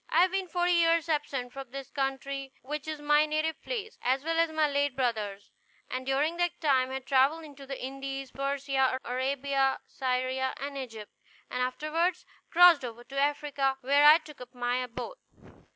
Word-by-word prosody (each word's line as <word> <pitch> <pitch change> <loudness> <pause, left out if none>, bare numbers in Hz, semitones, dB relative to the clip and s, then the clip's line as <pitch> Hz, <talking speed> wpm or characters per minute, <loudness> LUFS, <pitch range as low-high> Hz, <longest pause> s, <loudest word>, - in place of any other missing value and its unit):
I 335 +3 +5
have 370 - +2
been 380 -1 -1
forty 355 0 +1
years 335 -1 +3
absent 280 -5 -2
from 270 -2 -8
this 270 0 -8
country, 270 0 -3
which 295 +2 -5
is 310 -1 -4
my 295 +1 +3
native 310 +1 -1
place, 445 -3 -5
as 260 +2 +1
well 330 +1 0
as 330 0 +3
my 315 -1 +2
late 285 -2 0
brother's; 215 -6 -2 0.4
and 255 +1 -4
during 295 +5 +1
that 350 0 0
time 265 -5 +2
have 265 0 -5
travelled 275 +5 +3
into 280 -3 -12
the 270 -1 -5
Indies, 270 0 -5
Persia, 275 -1 0
Arabia, 270 +2 0
Syria, 260 0 -1
and 280 +1 -5
Egypt, 225 -6 -7 0.4
and 250 - -2
afterward 310 +7 0 0.3
crossed 345 -4 +7
over 240 -1 -6
into 275 +3 -5
Africa, 285 -2 0
where 280 +3 +4
I 305 +1 +10
took 300 -5 -13
up 250 +1 -11
my 245 0 0
abode. 255 - -5
275 Hz, 175 wpm, -29 LUFS, 260-310 Hz, 0.4 s, I